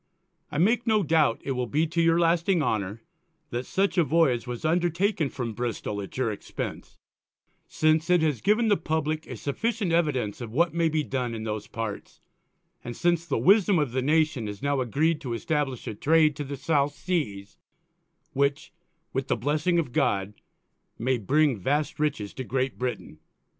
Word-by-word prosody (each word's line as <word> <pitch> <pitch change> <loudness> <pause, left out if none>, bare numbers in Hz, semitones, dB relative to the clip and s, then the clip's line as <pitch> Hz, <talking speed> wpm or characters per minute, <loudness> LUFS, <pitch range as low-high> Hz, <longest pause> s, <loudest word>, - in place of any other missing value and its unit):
_ - - -49 0.5
I - - -3
make 225 +8 +2
no 215 -2 +3
doubt, 155 -7 +2
it 140 - -3
will 125 -1 -1
be 150 +6 +1
to 170 +1 0
your 165 0 +4
lasting 170 0 +2
Honour, 105 -3 -2 0.5
that 120 +2 -3
such 195 -1 +1
a - - +5
Voyage 135 -5 +2
was 125 +4 -5
undertaken 175 0 +1
from 120 -4 -4
Bristol 115 -3 -3
_at 100 +3 -7
your 125 -4 +1
Expence; 105 - -6 0.7
since 155 +2 +1
it 175 -2 +4
has 150 -7 0
given 215 +3 +3
the 205 -2 +4
Publick 155 0 -2
a 125 - -7
sufficient 200 - -2
Evidence 135 -11 0
of 115 -2 -6
what 170 +8 +2
may 165 -1 +2
be 155 -1 0
done 125 -4 -2
in 110 - -5
those 105 -1 -4
Parts, 110 -3 -6 0.6
and 120 0 -7
since 170 -1 +1
the - - 0
Wisdom 200 -1 +4
of 145 -6 0
the 130 +1 0
Nation 150 -4 +1
has 105 +4 -7
now 140 -1 +1
agreed 150 +6 +1
to 125 -6 -4
establish 135 +1 -2
a - - -4
Trade 155 +5 +3
to 145 - -5
the_ 140 +1 -5
South 145 0 +1
Seas, 105 - -3 0.7
which, 140 +6 0 0.4
with 135 0 -2
the - - +1
Blessing 150 +8 +1
of 160 -7 0
God, 100 -1 +1 0.6
may 125 +1 0
bring 140 +2 +2
vast 145 +10 -1
Riches 140 -10 -1
to 130 - -5
GREAT 130 +2 -2
BRITAIN. 125 -1 -4
145 Hz, 180 wpm, -26 LUFS, 120-165 Hz, 0.7 s, a